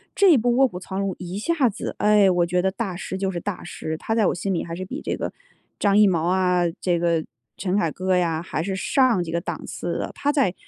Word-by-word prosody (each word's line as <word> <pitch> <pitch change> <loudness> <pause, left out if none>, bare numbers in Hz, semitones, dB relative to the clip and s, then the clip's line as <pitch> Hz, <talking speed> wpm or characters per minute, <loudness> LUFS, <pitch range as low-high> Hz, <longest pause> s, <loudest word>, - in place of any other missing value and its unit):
这 395 -2 +6
一 295 - +6
部 245 +2 +1
《卧 270 +1 +5
虎 180 -7 -7
藏 190 +1 -5
龙》 195 -1 0
一 180 +1 -5
下 280 +2 +2
子， 200 - -5
哎， 210 -2 +5
我 175 -1 +2
觉 180 +1 0
得 190 - +2
大 195 -2 -4
师 190 - -5
就 195 0 -1
是 175 - -3
大 205 +2 -5
师， 160 -2 -5
他 220 - -2
在 220 -2 +3
我 - - +1
心 195 +2 -2
里 170 - -1
还 165 - -6
是 185 - -5
比 260 +11 -6
这 - - -2
个 - - -4 0.5
张 200 -1 +3
艺 210 -1 +7
谋 170 -4 +1
啊， 180 -1 +2 0.2
这 175 -2 +1
个 170 -2 +1 0.3
陈 190 +1 -1
凯 165 -6 +1
歌 185 +2 0
呀， 165 -3 +1
还 165 -2 -3
是 195 0 -2
上 240 -1 +2
几 165 - -6
个 170 - 0
档 - - -5
次 - - -4
的。 - - -3
他 290 - +1
在 270 -11 +2
190 Hz, 280 characters per minute, -23 LUFS, 175-210 Hz, 0.5 s, 艺